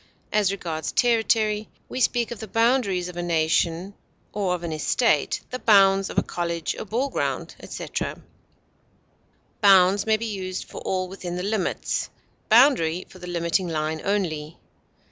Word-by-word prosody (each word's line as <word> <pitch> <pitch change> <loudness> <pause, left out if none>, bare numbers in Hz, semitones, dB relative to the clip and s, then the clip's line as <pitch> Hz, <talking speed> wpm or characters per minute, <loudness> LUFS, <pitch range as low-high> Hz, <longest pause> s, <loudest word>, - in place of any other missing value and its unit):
As 205 -2 +3
regards 165 -5 -4
territory, 220 -3 +2 0.2
we 255 - -4
speak 240 -1 +1
of 235 - -6
the 220 - -7
boundaries 225 -5 +1
of 180 -1 -9
a - - -1
nation 170 +2 0 0.4
or 190 -3 0
of 175 - -8
an 170 - -3
estate; 155 -1 +1
the 255 - -4
bounds 195 -3 +5
of - - -8
a - - +4
college, 170 -2 -3
a - - -7
ball 240 +7 -1
ground, - - -2
etc. - - -5 1.4
Bounds 195 0 +5
may 220 0 +4
be 230 - -4
used 190 -4 -4
for - - -10
all 185 -1 -1
within 180 -2 -6
the 180 - -3
limits, 205 -1 -1 0.4
boundary 215 - +4
for 185 - -14
the 180 - -9
limiting 175 +1 0
line 155 -1 -2
only. 165 -6 -2
190 Hz, 155 wpm, -24 LUFS, 175-215 Hz, 1.4 s, bounds